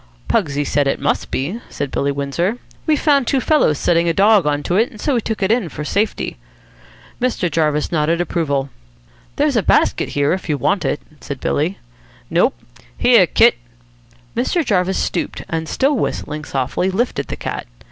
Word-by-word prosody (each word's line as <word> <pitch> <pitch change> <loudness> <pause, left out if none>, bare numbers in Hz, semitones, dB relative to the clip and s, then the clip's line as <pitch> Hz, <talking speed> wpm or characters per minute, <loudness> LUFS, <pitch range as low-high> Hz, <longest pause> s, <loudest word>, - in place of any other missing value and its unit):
"Pugsy 145 -4 0
said 145 -1 +1
it - - 0
must - - -1
be," 165 - -2
said 145 - -4
Billy 140 +1 0
Windsor. 140 - -1 0.3
"We 310 - +4
found 280 -4 +2
two 270 - +2
fellows 260 - +2
setting 170 +2 +2
a - - +2
dog 200 -2 +4
on 145 0 0
to 175 - -1
it, 220 +1 +1
so 285 - 0
we 240 - +1
took 220 -2 -3
it 190 - +2
in 225 -7 +1
for 150 0 -6
safety." 205 - -1 0.8
Mr. 235 -9 0
Jarvis 150 -1 +1
nodded 165 +1 +1
approval. 140 -6 -1 0.6
"There's - - +1
a - - +4
basket - - +2
here, 145 +2 +1
if 185 -2 -5
you 150 - +1
want 180 +6 0
it," 145 - -1 0.2
said 140 -2 -6
Billy. 165 +7 -1 0.5
"Nope. - - +2 0.4
Here, - - +5
kit." - - +4 0.8
Mr. 340 -4 0
Jarvis 190 -1 +1
stooped, 175 - -2
and, 160 -1 -3
still 280 +2 +2
whistling 150 - -3
softly, 135 +8 -1
lifted 190 - -1
the - - -4
cat. - - -5
170 Hz, 175 wpm, -19 LUFS, 145-215 Hz, 0.8 s, Here